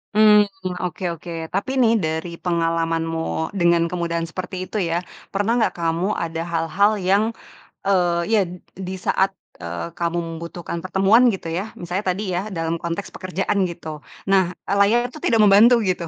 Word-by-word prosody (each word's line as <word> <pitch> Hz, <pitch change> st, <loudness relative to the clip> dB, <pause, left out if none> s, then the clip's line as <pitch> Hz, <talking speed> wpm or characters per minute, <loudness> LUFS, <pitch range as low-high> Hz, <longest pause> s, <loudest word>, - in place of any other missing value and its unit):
Mmm, 210 Hz, -1 st, +7 dB, 0.4 s
oke 180 Hz, 0 st, -4 dB
oke, 170 Hz, +2 st, -10 dB, 0.2 s
tapi 200 Hz, +6 st, -1 dB
nih 230 Hz, -3 st, +5 dB
dari 160 Hz, -3 st, -2 dB
pengalamanmu 165 Hz, 0 st, -1 dB
dengan 170 Hz, -2 st, +3 dB
kemudahan 170 Hz, -1 st, -2 dB
seperti 185 Hz, +1 st, -5 dB
itu -, -, -12 dB
ya, 170 Hz, +1 st, +1 dB, 0.3 s
pernah 205 Hz, +4 st, +1 dB
enggak 235 Hz, -, +2 dB
kamu 170 Hz, +4 st, 0 dB
ada 165 Hz, 0 st, -3 dB
hal-hal 170 Hz, +5 st, +2 dB
yang, 195 Hz, +3 st, +3 dB, 0.6 s
e 195 Hz, -, +1 dB, 0.4 s
iya, 205 Hz, -5 st, +3 dB, 0.4 s
di 185 Hz, -, -4 dB
saat, 190 Hz, +1 st, 0 dB, 0.2 s
eee, 85 Hz, 0 st, -5 dB
kamu 170 Hz, 0 st, 0 dB
membutuhkan 170 Hz, +1 st, -6 dB
pertemuan, 195 Hz, +7 st, +4 dB
gitu 190 Hz, -7 st, -1 dB
ya, 190 Hz, +6 st, -4 dB
misalnya 180 Hz, +4 st, -4 dB
tadi 205 Hz, -, -4 dB
ya, 175 Hz, 0 st, 0 dB
dalam 165 Hz, -4 st, -2 dB
konteks 170 Hz, +4 st, -4 dB
pekerjaan, 190 Hz, +1 st, -1 dB
gitu. 160 Hz, -3 st, -7 dB, 0.3 s
Nah, 185 Hz, -2 st, +3 dB
layarnya 210 Hz, +5 st, +2 dB
tuh 310 Hz, -, -10 dB
tidak 225 Hz, -2 st, +4 dB
membantu 220 Hz, +4 st, +6 dB
gitu, 180 Hz, -3 st, -1 dB
180 Hz, 155 wpm, -22 LUFS, 165-200 Hz, 0.6 s, Mmm